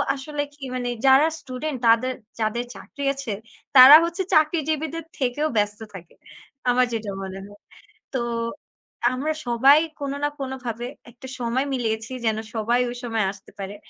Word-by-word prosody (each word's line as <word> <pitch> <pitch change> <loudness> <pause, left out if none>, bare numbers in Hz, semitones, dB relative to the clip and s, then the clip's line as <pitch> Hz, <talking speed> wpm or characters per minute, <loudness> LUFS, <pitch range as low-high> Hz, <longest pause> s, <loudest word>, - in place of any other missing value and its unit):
আসলে 290 +2 -4
কি 285 -1 -14
মানে 245 -1 -2 0.2
যারা 270 +4 +6
স্টুডেন্ট 260 +2 -5
তাদের 230 +3 +4 0.3
যাদের 225 +3 -1
চাকরি 280 - -9
আছে, 275 -6 -5 0.4
তারা 265 +3 +12
হচ্ছে 340 +3 -2
চাকরিজীবীদের 315 0 +1 0.2
থেকেও 270 +3 0
ব্যস্ত 210 +1 0
থাকে, 175 -3 -11 0.6
আমার 250 +1 +4
যেটা 220 -3 -3
মনে 190 0 -6
হয়। 205 0 -16 0.6
তো - - +1 0.9
আমরা 295 +5 -1
সবাই 265 +5 +6 0.2
কোন 280 -1 -3
না 290 - +2
কোন 270 -1 -4
ভাবে 235 +1 -4 0.2
একটা 245 +3 -12
সময় 245 +3 0
মিলিয়েছি 225 -1 -2
যেন 220 -1 +1 0.2
সবাই 235 +3 +1
ওই 245 - -6
সময় 225 -3 0
আসতে 195 -1 -16
পারে। 195 +1 -5
250 Hz, 150 wpm, -23 LUFS, 225-280 Hz, 0.9 s, তারা